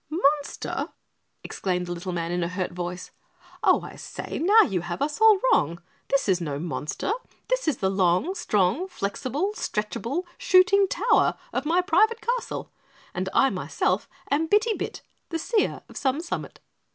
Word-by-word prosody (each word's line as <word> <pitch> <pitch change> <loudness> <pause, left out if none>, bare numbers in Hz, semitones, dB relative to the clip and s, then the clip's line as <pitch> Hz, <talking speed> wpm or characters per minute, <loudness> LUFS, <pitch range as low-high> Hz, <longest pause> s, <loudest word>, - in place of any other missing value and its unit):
"Monster?" 295 -3 0 0.5
exclaimed 180 -2 -2
the 175 - -6
little 175 +1 -4
man 170 -1 -2
in 175 0 -1
a 170 - 0
hurt 180 +1 -3
voice. 180 +1 -5 0.5
"Oh, - - +4
I - - -9
say - - -6
now, 410 +7 +6
you 185 -5 -1
have 175 +1 -5
us 300 +7 -2
all 440 -3 +7
wrong. 170 - +2 0.3
This 275 -4 +1
is 185 -2 +2
no 145 -4 -3
monster, 160 - -3 0.4
this - - 0
is 305 - +2
the 190 - 0
long, 190 - +2
strong, 210 - +1
flexible, 280 - -2
stretchable 235 - -2 0.2
SHOOTING 380 +2 +5
TOWER - - +2 0.2
of 265 +3 -1
my 345 +3 +3
private 435 +5 +3
castle, 480 +2 -3 0.4
and - - -2
I, - - +4
myself, - - -1 0.2
am 305 +3 +2
Bitty 425 +5 +3
Bit, - - -5 0.3
the 330 - -2
Seer 425 +6 0
of - - -15
Some 275 +1 0
Summit." 340 +1 -5
275 Hz, 165 wpm, -25 LUFS, -, 0.5 s, all